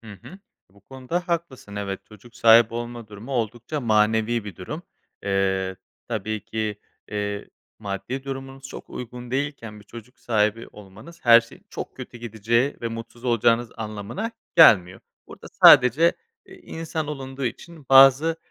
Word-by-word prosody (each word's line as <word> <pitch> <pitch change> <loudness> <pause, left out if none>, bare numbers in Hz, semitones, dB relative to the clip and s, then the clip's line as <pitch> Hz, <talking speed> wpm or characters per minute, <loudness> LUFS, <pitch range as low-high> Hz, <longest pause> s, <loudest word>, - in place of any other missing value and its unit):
Hı 110 -2 -11
hı. 190 - -12 0.3
Bu 100 +1 -23
konuda 135 - -5
haklısın. 145 -11 -4
Evet, 100 -1 -4
çocuk 110 +2 -17
sahibi 115 0 +6
olma 120 -1 -6
durumu 110 +6 -9
oldukça 120 +5 -3
manevi 110 0 +1
bir 100 -5 -9
durum. 150 - -7 0.4
Eee, 95 -1 0 0.3
tabii 110 -1 -3
ki, 110 -2 -4 0.3
eee, 105 -1 -4 0.3
maddi 110 +6 -5
durumunuz 135 0 -7
çok - - -10
uygun 125 0 -8
değilken 130 -6 -4
bir - - -17
çocuk 120 +3 -13
sahibi 110 0 0
olmanız 105 - -14
her 115 0 +8
şeyin 115 - -17
çok - - -7
kötü 120 - -9
gideceği 115 +4 -1
ve 115 - -2
mutsuz 115 +2 -9
olacağınız 115 0 +2
anlamına 110 - -5 0.3
gelmiyor. 95 - +6 0.3
Burada - - -12 0.2
sadece 140 +8 +7 0.3
i - - -14
insan 160 -1 -5
olunduğu 135 -2 -6
için 150 +4 -7
bazı, 135 +4 +6
115 Hz, 145 wpm, -23 LUFS, 105-135 Hz, 0.4 s, her